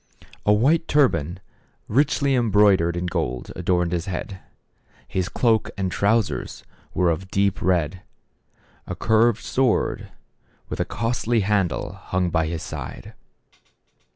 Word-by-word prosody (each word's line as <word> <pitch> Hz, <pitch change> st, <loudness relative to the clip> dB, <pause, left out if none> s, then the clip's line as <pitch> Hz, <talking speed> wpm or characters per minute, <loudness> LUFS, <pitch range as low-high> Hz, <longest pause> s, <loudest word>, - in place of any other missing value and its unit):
A -, -, +6 dB
white 140 Hz, +11 st, +3 dB
turban, 90 Hz, -, +2 dB, 0.5 s
richly 140 Hz, +3 st, +2 dB
embroidered 105 Hz, -8 st, +3 dB
with 90 Hz, 0 st, -3 dB
gold, 60 Hz, 0 st, -3 dB
adorned 90 Hz, -1 st, 0 dB
his 85 Hz, 0 st, -2 dB
head; 95 Hz, +1 st, -5 dB, 0.7 s
his 95 Hz, 0 st, -2 dB
cloak 110 Hz, 0 st, +1 dB
and 95 Hz, -2 st, -1 dB
trousers 105 Hz, +4 st, 0 dB, 0.3 s
were 90 Hz, -2 st, +3 dB
of 90 Hz, +4 st, -4 dB
deep 100 Hz, 0 st, +1 dB
red; 90 Hz, -1 st, 0 dB, 0.9 s
a -, -, -4 dB
curved 110 Hz, 0 st, +2 dB
sword, 130 Hz, -3 st, 0 dB, 0.6 s
with -, -, -5 dB
a -, -, +1 dB
costly 115 Hz, 0 st, 0 dB
handle, 95 Hz, -5 st, 0 dB
hung 90 Hz, -1 st, -2 dB
by 80 Hz, -1 st, +1 dB
his 80 Hz, -1 st, -4 dB
side. -, -, -7 dB
95 Hz, 125 wpm, -23 LUFS, 90-115 Hz, 0.9 s, A